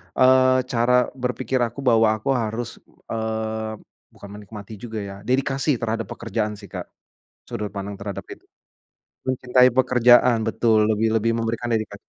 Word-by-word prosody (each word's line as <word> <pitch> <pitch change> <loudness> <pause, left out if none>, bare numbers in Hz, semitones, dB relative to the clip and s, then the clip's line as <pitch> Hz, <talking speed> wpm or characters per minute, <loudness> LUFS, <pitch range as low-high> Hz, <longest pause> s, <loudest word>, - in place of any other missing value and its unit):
eee, 130 0 +5
cara 120 +1 +2 0.3
berpikir 125 +1 -1
aku 115 +4 -11
bahwa 115 -3 +4
aku 110 +6 -2
harus, 115 -2 -2 0.3
eee, 110 0 -3 0.4
bukan 100 - -13
menikmati 105 0 -10
juga 110 0 -6
ya, 100 -1 -7
dedikasi 135 +2 +1
terhadap 115 -2 -3
pekerjaan 110 -1 -3
sih, 100 - -11
Kak, - - -6 0.6
sudut 105 -1 -4
pandang 100 0 -6
terhadap 100 -1 -6
itu. - - -10 0.9
Mencintai 125 0 +4
pekerjaan 125 -2 +4
betul. 110 0 +2
Lebih 110 +1 +1
lebih 115 +1 +1
memberikan 115 +1 -2
dedika 110 -2 -1
115 Hz, 140 wpm, -23 LUFS, 110-125 Hz, 0.9 s, eee